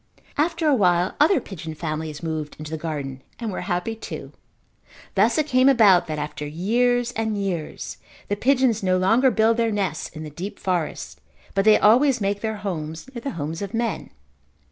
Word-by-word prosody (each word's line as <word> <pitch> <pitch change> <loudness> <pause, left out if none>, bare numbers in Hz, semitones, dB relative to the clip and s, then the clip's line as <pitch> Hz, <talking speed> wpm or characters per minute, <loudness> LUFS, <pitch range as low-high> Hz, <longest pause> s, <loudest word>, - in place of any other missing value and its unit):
After 325 +2 +1
a 295 - +5
while 180 -6 +3
other 320 +6 +5
pigeon 160 -4 -8
families 155 -1 -4
moved 155 -2 -3
into 155 0 -8
the - - -2
garden 145 -5 -5 0.2
and 230 -3 -4
were - - -4
happy 180 +4 -2
too. 225 - -8 0.8
Thus 220 +4 +3
it 310 - +2
came 260 -2 +4
about 210 -9 +5
that 155 -1 -3
after 150 0 -5
years 235 +10 +1
and 220 -2 -2
years 185 -6 -4 0.3
the 205 - 0
pigeons 250 -1 +2
no 185 -1 +2
longer 225 +8 +4
build 225 0 +3
their 230 -1 +1
nests 195 -6 -2
in 155 -1 -9
the 155 - -7
deep 190 +7 -6
forest, 180 -4 -3 0.3
but 195 0 +1
they 215 -1 +7
always 250 +4 +4
make 200 0 -1
their 220 -1 -2
homes 160 0 -4
near 235 - -6
the 280 - -3
homes 160 +3 -4
of 200 +2 -4
men. 230 -6 -2
200 Hz, 185 wpm, -23 LUFS, 160-235 Hz, 0.8 s, they